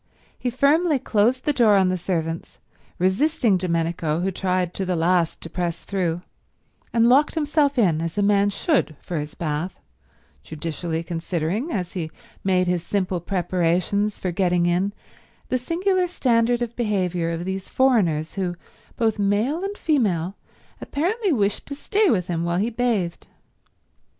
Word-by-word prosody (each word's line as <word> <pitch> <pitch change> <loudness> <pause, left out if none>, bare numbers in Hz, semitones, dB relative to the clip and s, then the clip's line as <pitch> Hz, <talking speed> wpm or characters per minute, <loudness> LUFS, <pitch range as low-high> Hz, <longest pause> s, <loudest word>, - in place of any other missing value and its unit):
He 250 - -2
firmly 295 +5 +3
closed 240 0 +1
the 295 - +2
door 230 -6 +5
on 190 -2 +4
the 185 - +1
servants, 165 -2 -3 0.4
resisting 215 - +2
Domenico, 165 -3 -1
who 190 +2 0
tried 185 -1 -1
to 195 - -3
the 185 -1 -1
last 170 0 +1
to - - -6
press 170 0 -3
through, 175 -3 -2 0.7
and 230 0 +4
locked 280 +6 +4
himself 295 -2 +1
in 170 -9 +3
as 165 +3 -4
a 205 - +2
man 200 0 +3
should 205 - 0
for 170 -3 -4
his 150 +1 -6
bath, 160 +2 -3 0.6
judicially 160 - -4
considering, 170 - -2
as 180 -4 -3
he 170 -5 -3 0.3
made 185 -1 +2
his 180 -1 0
simple 185 -2 -1
preparations 180 +3 0
for 185 - -2
getting 175 -1 +2
in, 180 +3 +1 0.6
the 255 - +1
singular 360 +7 +1
standard 240 -7 +2
of 235 0 -5
behaviour 185 -7 0
of 170 +1 -3
these 190 0 -4
foreigners 185 -13 +2
who, 185 -3 -2 0.4
both 225 -3 +1
male 215 - +1
and 400 +1 -4
female, 195 - +1 0.5
apparently 380 +7 -1
wished 205 -7 0
to 280 - -5
stay 405 +7 +1
with 185 - +2
him 170 -2 -2
while 170 0 0
he 215 +5 0
bathed. 220 -7 -1
190 Hz, 155 wpm, -23 LUFS, 175-245 Hz, 0.7 s, door